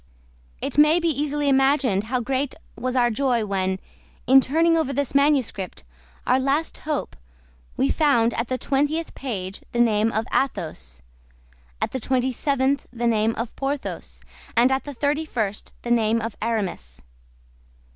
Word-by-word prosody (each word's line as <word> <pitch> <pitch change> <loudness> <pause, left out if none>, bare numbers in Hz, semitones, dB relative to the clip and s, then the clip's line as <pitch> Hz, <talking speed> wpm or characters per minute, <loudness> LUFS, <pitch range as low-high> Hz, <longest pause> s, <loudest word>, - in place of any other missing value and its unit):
It - - -1
may 305 +3 +6
be 335 -1 +1
easily 295 0 -1
imagined 270 -6 +3
how 250 +2 -1
great 265 +3 -1 0.2
was 255 +2 -3
our 240 -2 +3
joy 240 -2 +1
when, 190 -2 -1 0.5
in 270 +2 +7
turning 330 +5 +2
over 320 -4 +1
this 280 -1 -1
manuscript, 275 - +1 0.4
our 260 - +3
last 275 +4 0
hope, 300 -1 -3 0.6
we 135 - +2
found 240 -7 +3
at 230 - -2
the 255 - -1
twentieth 290 +6 -1
page 195 -7 -5
the 240 - -1
name 225 -1 +3
of 220 +1 -1
Athos, 65 - -2 0.8
at - - -1
the 260 - -3
twenty 260 +1 0
seventh 275 +1 0
the 240 -1 -3
name 225 -1 +2
of 230 0 -5
Porthos, 275 +1 -4 0.3
and 245 +3 +5
at 265 0 0
the 290 -2 -7
thirty 295 +4 0
first 220 -9 -3
the 240 - -3
name 230 -1 +3
of 225 -1 -4
Aramis. 195 - -3
255 Hz, 155 wpm, -23 LUFS, 225-280 Hz, 0.8 s, in